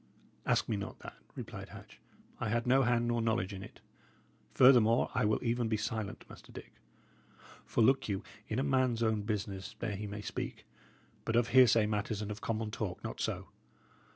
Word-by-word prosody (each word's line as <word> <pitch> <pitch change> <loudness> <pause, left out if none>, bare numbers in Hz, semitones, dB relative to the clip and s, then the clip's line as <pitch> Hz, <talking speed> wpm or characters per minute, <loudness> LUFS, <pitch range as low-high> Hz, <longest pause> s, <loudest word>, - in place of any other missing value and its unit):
"Ask - - +2
me 110 - -1
not 100 - -6
that," - - -8 0.2
replied - - -7
Hatch. - - -13 0.4
"I - - -1
had 115 +1 0
no 130 +2 +5
hand 120 -2 +2
nor 120 -1 +1
knowledge 110 -3 0
in 95 - -7
it; 105 - -12 0.7
furthermore, 120 -3 +5
I - - +1
will 105 0 +3
even 120 0 0
be 110 -1 0
silent, 110 -1 -4
Master - - -14
Dick. - - -11 0.9
For 115 - +2
look 130 0 +3
you, 95 -1 -2 0.2
in 110 - -2
a 130 - +1
man's 130 -4 +2
own 110 -2 +1
business 100 -2 -4
there 110 -2 -3
he 105 +2 -5
may 105 +1 -6
speak; - - -5 0.6
but 115 - -1
of 120 0 +3
hearsay 120 -4 +6
matters 105 0 -1
and 105 0 -4
of 105 +1 -7
common 110 -1 -2
talk, 105 -4 -4
not - - -5
so. - - -3
110 Hz, 185 wpm, -32 LUFS, 105-120 Hz, 0.9 s, hearsay